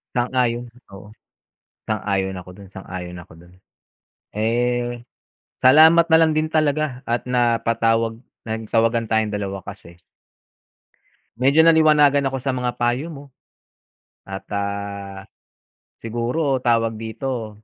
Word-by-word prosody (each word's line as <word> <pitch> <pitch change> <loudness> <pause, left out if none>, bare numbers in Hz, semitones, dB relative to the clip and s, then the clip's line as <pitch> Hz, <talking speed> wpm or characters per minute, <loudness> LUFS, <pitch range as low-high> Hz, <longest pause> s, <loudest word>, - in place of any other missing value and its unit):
Sang-ayon. 120 -1 0 0.2
Oo. 100 +1 -12 0.8
Sang-ayon 100 -3 -2
ako 90 - -12
dun. 100 -1 -13
Sang-ayon 90 -2 -8
ako 85 - -14
dun. 85 +2 -18 0.8
Eh, 120 +2 -1 0.6
salamat 160 +6 +6
na - - +9
lang 160 -1 +4
din 155 0 +1
talaga 155 -4 0
at 120 +1 -1
napatawag 115 -2 +1 0.2
nagtawagan 115 +1 0
tayong 110 -1 0
dalawa 100 -1 -4
kasi 85 +1 -11 1.4
medyo 140 +5 +4
naliwanagan 150 -4 +5
ako 135 0 -3
sa 135 - 0
mga 125 -1 -2
payo 120 +6 -1
mo 145 -3 -10 1.0
at, 95 0 -8
ah, 100 -1 -5 0.7
siguro 125 +4 -2
tawag 115 -1 +1
dito 115 +1 -5
115 Hz, 110 wpm, -21 LUFS, 105-135 Hz, 1.4 s, na